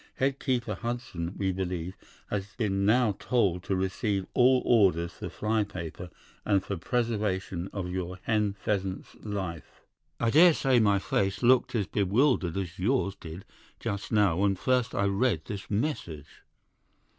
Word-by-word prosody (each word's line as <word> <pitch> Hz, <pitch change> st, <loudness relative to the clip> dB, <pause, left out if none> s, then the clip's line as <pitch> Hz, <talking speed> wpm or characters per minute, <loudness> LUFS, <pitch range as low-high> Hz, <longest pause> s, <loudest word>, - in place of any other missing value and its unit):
'Head 135 Hz, +1 st, 0 dB
keeper 120 Hz, -5 st, -1 dB
Hudson, 100 Hz, -5 st, -4 dB
we 95 Hz, -1 st, 0 dB
believe, 90 Hz, -1 st, -3 dB, 0.4 s
has 100 Hz, 0 st, -3 dB
been 100 Hz, -4 st, 0 dB
now 120 Hz, 0 st, +4 dB
told 100 Hz, -7 st, +1 dB
to 95 Hz, -, 0 dB
receive 95 Hz, +1 st, -1 dB
all 130 Hz, 0 st, +4 dB
orders 90 Hz, -7 st, +3 dB
for -, -, -7 dB
fly 110 Hz, 0 st, 0 dB
paper 90 Hz, -2 st, -7 dB, 0.3 s
and 100 Hz, -3 st, +2 dB
for 100 Hz, -, -3 dB
preservation 100 Hz, -3 st, -2 dB
of 95 Hz, -3 st, -4 dB
your 90 Hz, 0 st, -4 dB
hen 105 Hz, -3 st, +1 dB
pheasant's 95 Hz, -1 st, -3 dB
life.' 95 Hz, -6 st, -5 dB, 0.4 s
"I 115 Hz, -1 st, +1 dB
daresay 150 Hz, -5 st, +5 dB
my 100 Hz, -3 st, +4 dB
face 95 Hz, +2 st, -1 dB
looked 125 Hz, 0 st, +4 dB
as 105 Hz, -4 st, +1 dB
bewildered 100 Hz, -, +1 dB
as 90 Hz, -2 st, -4 dB
yours 105 Hz, 0 st, +1 dB
did 85 Hz, 0 st, -9 dB, 0.3 s
just 100 Hz, 0 st, -4 dB
now 105 Hz, -6 st, +3 dB
when 100 Hz, 0 st, +2 dB
first 125 Hz, +4 st, 0 dB
I 100 Hz, -, +1 dB
read 100 Hz, -3 st, +1 dB
this 100 Hz, -2 st, -7 dB
message. 100 Hz, -, -3 dB
100 Hz, 145 wpm, -28 LUFS, 95-115 Hz, 0.4 s, daresay